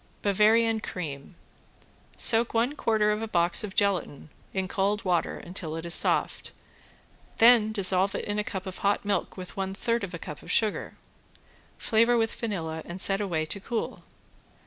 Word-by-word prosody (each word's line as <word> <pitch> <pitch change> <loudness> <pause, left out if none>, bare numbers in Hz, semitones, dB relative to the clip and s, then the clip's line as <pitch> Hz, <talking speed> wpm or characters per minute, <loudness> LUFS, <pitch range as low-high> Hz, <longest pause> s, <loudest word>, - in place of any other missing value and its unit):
~BAVARIAN 220 +3 +3
CREAM~ 160 -6 -6 0.8
Soak 230 0 +4
one 235 +5 +2
quarter 215 -5 +1
of 210 +1 -2
a 225 - -3
box 170 -2 +2
of 200 -3 -6
gelatin 185 -8 -1 0.2
in 190 -1 -2
cold 200 +2 -1
water 175 -3 0
until 170 -3 -5
it 165 +1 -6
is 170 - +3
soft, - - +1 0.9
then 225 -2 +6
dissolve 195 -2 +1
it - - -3
in 205 0 -2
a - - 0
cup 190 -2 -5
of 185 -1 -6
hot 200 +1 0
milk 205 -1 -2
with 180 -1 -9
one 195 0 -3
third 230 +2 -1
of 180 -3 -5
a - - -4
cup 150 -3 -8
of - - -7
sugar. 215 -2 0 0.8
Flavor 230 +1 +3
with 225 -1 0
vanilla 165 -8 -4
and 175 +2 -8
set 195 +1 +1
away 165 -6 -1
to 200 - -2
cool. 225 +3 -4
200 Hz, 170 wpm, -27 LUFS, 180-220 Hz, 0.9 s, then